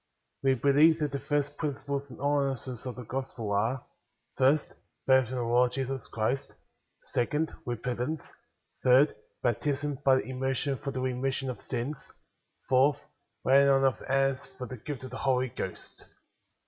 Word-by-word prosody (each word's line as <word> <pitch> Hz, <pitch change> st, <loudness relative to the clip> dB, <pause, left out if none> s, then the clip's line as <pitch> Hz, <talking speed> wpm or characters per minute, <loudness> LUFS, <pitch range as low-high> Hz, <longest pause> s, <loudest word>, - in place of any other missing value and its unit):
4. 135 Hz, -, +2 dB
We 135 Hz, -, +4 dB
believe 145 Hz, +5 st, +5 dB
that 150 Hz, -2 st, -1 dB
the 140 Hz, -, -2 dB
first 145 Hz, 0 st, -1 dB
principles 140 Hz, -2 st, -3 dB
and -, -, -10 dB
ordi 140 Hz, -1 st, +1 dB
nances 125 Hz, 0 st, -6 dB
of 125 Hz, -, -5 dB
the 125 Hz, -, -7 dB
Gospel 125 Hz, -3 st, -4 dB
are: 115 Hz, +6 st, 0 dB, 0.2 s
— -, -, -49 dB
First, 135 Hz, +3 st, +3 dB, 0.3 s
Faith 130 Hz, -3 st, +5 dB
in 130 Hz, -, -4 dB
the 125 Hz, -, -1 dB
Lord 120 Hz, +1 st, +3 dB
Jesus 135 Hz, -2 st, -3 dB
Christ; 125 Hz, +5 st, -2 dB, 0.6 s
Second, 150 Hz, +6 st, 0 dB
Eepentance; 125 Hz, +5 st, -2 dB, 0.6 s
Third, 130 Hz, +4 st, +6 dB, 0.3 s
Baptism 140 Hz, +4 st, 0 dB
by 130 Hz, -1 st, +4 dB
immersion 135 Hz, +1 st, -2 dB
for 140 Hz, -, -4 dB
the 130 Hz, -1 st, -3 dB
remission 130 Hz, +1 st, -1 dB
of 125 Hz, -, -9 dB
sins; 130 Hz, +3 st, -5 dB, 0.5 s
Fourth, 135 Hz, +1 st, +4 dB, 0.5 s
Lay 135 Hz, +2 st, +7 dB
ing 140 Hz, -, +5 dB
on 135 Hz, 0 st, +4 dB
of 135 Hz, -2 st, +2 dB
Hands 135 Hz, 0 st, +1 dB
for 125 Hz, -, -5 dB
the 130 Hz, +1 st, -7 dB
Gift 135 Hz, +3 st, -6 dB
of 130 Hz, -, -7 dB
the 130 Hz, -, -5 dB
Holy 130 Hz, -1 st, +1 dB
Ghost. -, -, -7 dB
135 Hz, 165 wpm, -29 LUFS, 125-140 Hz, 0.6 s, Lay